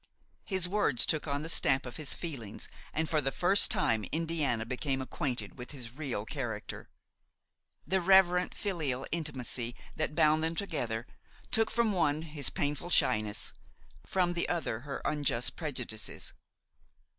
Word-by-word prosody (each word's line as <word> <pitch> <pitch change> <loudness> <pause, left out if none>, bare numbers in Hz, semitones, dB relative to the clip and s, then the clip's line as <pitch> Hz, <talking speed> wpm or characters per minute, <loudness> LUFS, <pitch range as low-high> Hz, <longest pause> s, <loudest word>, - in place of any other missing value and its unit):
His 190 -3 -1
words 180 - +2
took 155 0 +2
on 140 +1 -1
the - - -4
stamp 135 -4 +3
of 125 - -7
his 155 -3 +1
feelings 135 - -5 0.2
and 160 +1 0
for 155 -1 +2
the 135 -1 0
first 190 +6 +5
time 110 -2 +2
Indiana 155 -8 0
became 135 +3 -1
acquainted 130 -1 -3
with 125 - -7
his 125 -5 -5
real 135 -8 -3
character. 115 -6 -5 1.0
The 190 0 +1
reverent, 180 -1 +5
filial 150 -10 -1
intimacy 130 -6 -2 0.2
that 155 -1 -1
bound 155 +1 +4
them 165 +1 0
together 120 - -2 0.5
took 225 0 +3
from 235 -2 +2
the 195 - -2
one 155 -2 +2
his 150 -3 -1
painful 150 0 -2
shyness, 105 -10 +2 0.5
from 180 -2 +1
the 170 - 0
other 165 -10 -1
her 140 +2 -6
unjust 140 -5 0
prejudices. 125 -9 -4
150 Hz, 145 wpm, -31 LUFS, 125-170 Hz, 1.0 s, first